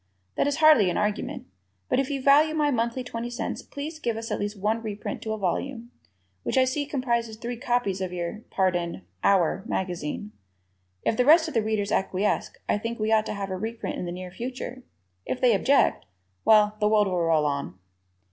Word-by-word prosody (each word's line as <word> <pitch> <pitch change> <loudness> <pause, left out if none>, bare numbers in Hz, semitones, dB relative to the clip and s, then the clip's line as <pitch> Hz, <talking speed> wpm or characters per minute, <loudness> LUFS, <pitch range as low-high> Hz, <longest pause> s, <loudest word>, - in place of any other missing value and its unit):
That - - +1
is 285 - +1
hardly 305 - +6
an - - -1
argument, 210 0 -2 0.4
but - - +1
if 270 - 0
you 280 -1 -2
value 300 +3 +5
my 295 -2 +2
monthly 235 +1 -1
twenty 240 -1 -5
cents 240 - -4
please 305 +3 -7
give 235 -6 -1
us 225 0 -5
at - - -1
least 205 +1 -3
one 215 +3 0
reprint 210 -2 -5
to 220 - -4
a - - -3
volume, 235 +5 -3 0.5
which - - -2
I 260 - +6
see 280 +3 -1
comprises 235 -5 -1
three 240 +2 -4
copies 240 -6 -1
of 185 -1 -2
your 175 +3 -4
pardon, 175 - 0 0.2
"our" 190 -1 +3
magazine. 180 - -3 0.7
If 220 - +1
the 250 - +3
rest 320 +3 +7
of 315 - -5
the 225 - +2
Readers 215 -1 -1
acquiesce 195 +1 0 0.2
I - - +1
think 230 +2 -4
we 215 0 -1
ought 220 -1 +3
to - - -3
have 195 -1 -4
a - - -1
reprint 225 +4 -4
in - - -3
the 175 - -4
near 180 0 -7
future. 250 +4 -6 0.5
If 255 - -2
they 250 -3 +5
object, 270 - +3 0.4
well, 210 -1 +5
the 210 - +3
world 210 -1 +4
will 180 -3 0
roll 160 -2 +3
on. 140 -11 -2
220 Hz, 205 wpm, -26 LUFS, 195-250 Hz, 0.7 s, rest